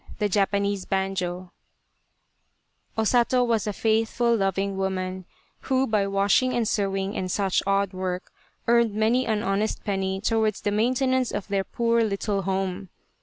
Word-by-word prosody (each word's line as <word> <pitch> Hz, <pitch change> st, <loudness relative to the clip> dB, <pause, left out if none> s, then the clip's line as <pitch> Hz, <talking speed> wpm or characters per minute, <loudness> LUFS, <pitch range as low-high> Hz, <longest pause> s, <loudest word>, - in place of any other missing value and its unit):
'i 195 Hz, -3 st, -1 dB, 1.5 s
O 220 Hz, -, +2 dB
Sato 245 Hz, +2 st, +3 dB
was 230 Hz, -3 st, 0 dB
a -, -, 0 dB
faithful 225 Hz, +3 st, +1 dB
loving 195 Hz, -1 st, 0 dB
woman, 185 Hz, -1 st, -3 dB, 0.3 s
who 265 Hz, 0 st, +1 dB
by 210 Hz, -4 st, +1 dB
washing 200 Hz, +6 st, +2 dB
and 235 Hz, -2 st, +1 dB
sewing, 195 Hz, -1 st, -1 dB
and 185 Hz, -, -2 dB
such 195 Hz, 0 st, +1 dB
odd 195 Hz, -1 st, +1 dB
work, 185 Hz, 0 st, -4 dB, 0.4 s
earned 235 Hz, -2 st, +3 dB
many 230 Hz, +4 st, +2 dB
an 215 Hz, -2 st, 0 dB
honest 200 Hz, +3 st, -1 dB
penny 190 Hz, -2 st, -1 dB
towards 220 Hz, 0 st, 0 dB
the 205 Hz, -, -1 dB
maintenance 255 Hz, +3 st, +1 dB
of 205 Hz, -, -4 dB
their 195 Hz, -1 st, 0 dB
poor 235 Hz, +2 st, +1 dB
little 200 Hz, -1 st, -1 dB
home. 190 Hz, 0 st, -2 dB
200 Hz, 135 wpm, -25 LUFS, 195-225 Hz, 1.5 s, Sato